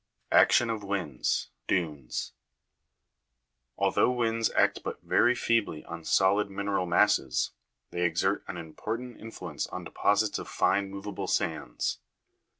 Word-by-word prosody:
3. - - +7
Action 120 - +5
of 110 -2 -4
winds 90 -10 -1 0.2
dunes. 75 -8 -2 1.4
Although - - +3
winds 115 -3 +1
act - - +3
but - - -4
very 120 +1 +4
feebly 110 -11 0
on 85 0 -7
solid 100 +4 +3
mineral 100 -1 -1
masses, 85 -6 +2 0.4
they 90 - -3
exert 90 +3 +1
an 90 - -5
important 110 +9 -5
influence 115 0 -5
on - - -6
deposits 105 +1 +1
of - - -8
fine 100 +1 +1
movable 100 0 -5
sands. 80 -9 -1
100 Hz, 125 wpm, -29 LUFS, 85-110 Hz, 1.4 s, 3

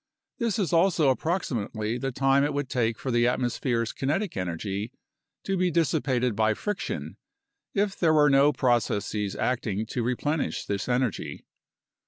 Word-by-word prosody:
This 230 -3 0
is 190 -5 -1
also 165 -4 +4
approximately 120 - -2
the 135 0 -2
time 135 +2 +3
it 145 0 0
would 145 -2 -2
take 115 -3 0
for 130 - -3
the 120 0 +3
atmo 125 0 +1
sphere's 115 -4 -1
kinetic 160 +8 -1
energy 95 +5 -3 0.5
to 195 - -1
be 180 -1 +2
dissipated 135 -7 +1
by 110 +1 +2
friction, 210 -2 -4 0.6
if 200 -1 +1
there 160 -3 +4
were 150 -1 +5
no 140 +2 +5
processes 110 -5 0
acting 110 -4 -1
to 120 +2 -3
replenish 135 +6 -1
this 100 +3 -3
energy. 125 -2 -1
130 Hz, 150 wpm, -27 LUFS, 115-155 Hz, 0.6 s, were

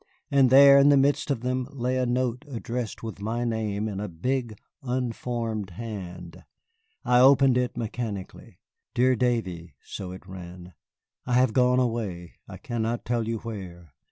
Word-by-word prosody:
And 135 -2 +5
there, 140 +1 +8
in 140 +1 +6
the 145 - +6
midst 140 +3 +2
of 135 -5 -1
them, 125 0 -2
lay 125 -1 -2
a 130 -1 0
note 125 +1 -1
addressed 120 -3 -5
with 110 -3 -7
my 115 +3 -2
name 110 -2 -2
in 100 -3 -4
a 105 - -3
big, 115 +6 -2 0.2
unformed 120 -4 -3
hand. 90 -4 -8 0.6
I 125 0 +4
opened 135 0 +6
it 125 -1 -1
mechanically. 110 -4 -6 0.4
"Dear 130 +1 +3
Davy," 95 - -2
so 95 -2 -7
it 95 0 -10
ran, 90 -1 -10 0.5
"I 125 - -1
have 125 -2 +3
gone 125 -1 +3
away, 110 -8 -3
I - - -9
cannot 115 0 -3
tell 120 -2 -1
you 115 0 -1
where. 90 - -8
115 Hz, 155 wpm, -26 LUFS, 100-125 Hz, 0.6 s, there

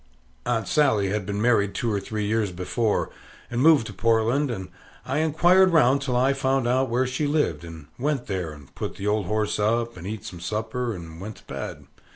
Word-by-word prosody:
Aunt 115 -2 0
Sally 110 -10 +3
had 100 -2 -2
been 100 0 -2
married 105 -3 +2
two 115 - -1
or 100 - +1
three 105 +1 -3
years 105 -2 0
before, 95 +5 -1 0.4
and 120 +1 0
moved 155 -5 +6
to 105 - -7
Portland; 115 +7 +2
and 95 -6 -5 0.4
I 140 - -1
inquired 175 +4 +4
round 140 -3 +4
till 130 -3 -1
I 130 +3 +3
found 135 -2 0
out 130 +1 +2
where 125 +3 +1
she 130 +4 -1
lived, 145 - 0
and 80 -3 -10
went 140 -1 -1
there, 90 -5 -3
and 75 -3 -14
put - - -5
the 100 - -6
old 105 -2 +1
horse 110 0 0
up, 115 +1 0
and 90 +2 -7
eat 105 -1 -5
some 90 - -8
supper, 110 +5 -3
and 80 -1 -9
went 105 +1 -6
to - - -18
bed. - - -6
115 Hz, 205 wpm, -25 LUFS, 100-130 Hz, 0.4 s, moved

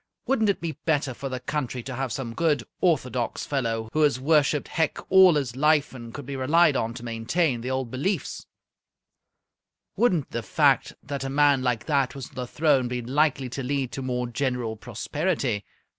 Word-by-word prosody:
Wouldn't 225 -6 +2
it 200 - +1
be 160 -3 -4
better 145 -5 +1
for 135 +3 -6
the 130 -1 -4
country 125 -2 -3
to 135 - -6
have 130 0 -3
some 115 +1 -4
good 150 -4 +1 0.2
orthodox 130 -8 0
fellow 115 -5 -1
who 155 - +1
has 145 -5 +3
worshipped 150 0 +2
Hec 160 -2 0
all 190 -3 +8
his 135 -5 -1
life, 150 +1 +2
and 120 -3 -9
could 140 +2 -8
be 140 +1 -5
relied 150 +4 +4
on 115 -1 -1
to 120 -1 -8
maintain 120 +4 0
the 125 - -4
old 130 -2 -2
beliefs 145 +11 -2 1.5
wouldn't 180 - +1
the 115 - -2
fact 140 +3 +2
that 140 -1 -4
a 135 - -3
man 140 -1 +4
like 125 -3 -1
that 140 -3 +1
was 135 -3 -7
on - - -25
the 125 -1 -4
throne 140 -3 +2
be 125 0 -3
likely 135 +1 +1
to 135 - -5
lead 135 -1 -2
to 135 - -5
more 125 -1 -2
general 125 -2 -2
prosperity? 120 - -2
135 Hz, 190 wpm, -25 LUFS, 125-150 Hz, 1.5 s, all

